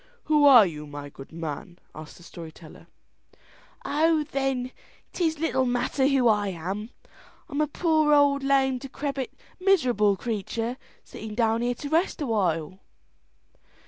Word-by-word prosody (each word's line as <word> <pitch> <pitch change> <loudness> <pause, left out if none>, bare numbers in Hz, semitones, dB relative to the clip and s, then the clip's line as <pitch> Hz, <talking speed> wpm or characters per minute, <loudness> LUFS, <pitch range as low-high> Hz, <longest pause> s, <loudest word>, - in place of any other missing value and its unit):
"Who 300 -2 +3
are 250 -7 +9
you, 150 -4 -6
my 145 0 -8
good 135 -1 -13
man?" 165 +2 -6 0.2
asked 155 -1 -11
the 175 - -16
story 165 -2 -10
teller. 155 0 -15 1.0
"Oh, 315 +1 +2
then, 270 -3 -2 0.4
'tis 320 -3 0
little 265 -5 0
matter 250 +2 +1
who 270 -3 +3
I 210 -2 +2
am. 190 +5 -5 0.6
I'm 295 -2 -2
a 305 - +2
poor, 310 0 +1
old, 285 -1 +4
lame, 270 -2 +2
decrepit, 275 0 -4 0.3
miserable 250 - +3
creature, 230 +2 -3 0.3
sitting 215 -1 -9
down 225 0 +1
here 245 +1 0
to 285 +4 -7
rest 330 +5 +1
awhile." 185 - -1
245 Hz, 140 wpm, -26 LUFS, 195-285 Hz, 1.0 s, are